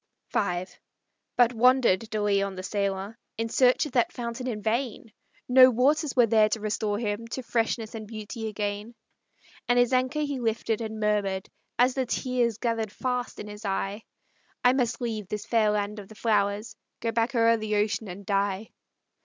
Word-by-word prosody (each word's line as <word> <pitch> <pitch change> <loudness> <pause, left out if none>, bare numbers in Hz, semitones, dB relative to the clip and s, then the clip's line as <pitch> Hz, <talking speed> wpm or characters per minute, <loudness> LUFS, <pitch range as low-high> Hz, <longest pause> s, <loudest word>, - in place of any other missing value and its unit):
V 180 -2 0 0.7
But 245 0 +5
wandered 235 -3 +3
De 215 - -2
Leon, 200 -1 +1
the 185 - -6
sailor, 200 +2 -2 0.2
In 225 0 -2
search 250 +5 +4
of 295 - -6
that 240 -2 +2
fountain 240 +1 -5
in 225 -4 -2
vain; 225 -1 -2 0.3
No 255 0 +8
waters 280 +5 +2
were 245 -2 +6
there 215 -1 +4
to 220 - -1
restore 210 -1 -1
him 215 0 -3
To 255 +3 -5
freshness 225 -1 -1
and 220 -2 -7
beauty 220 +1 -6
again. 210 +2 -4 0.7
And 245 - +3
his 245 +1 +3
anchor 255 +4 +1
he 285 -3 -2
lifted, 225 -1 -1
and 220 -1 -5
murmured, 205 -3 0 0.3
As 250 +1 +4
the 260 -1 -1
tears 245 -3 0
gathered 230 -3 -1
fast 250 +1 -3
in - - -6
his 210 0 -9
eye, 195 +1 -2 0.6
"I 250 0 +6
must 245 -2 0
leave 220 -4 -3
this 210 +1 -4
fair 225 -2 +3
land 210 0 -1
of 200 - -10
the 220 - -14
flowers, 210 0 0 0.2
Go 230 - -1
back 230 +3 0
o'er 230 0 +4
the 215 -1 -2
ocean, 210 +1 0
and 195 +2 -8
die." 200 +1 -1
225 Hz, 180 wpm, -27 LUFS, 210-245 Hz, 0.7 s, No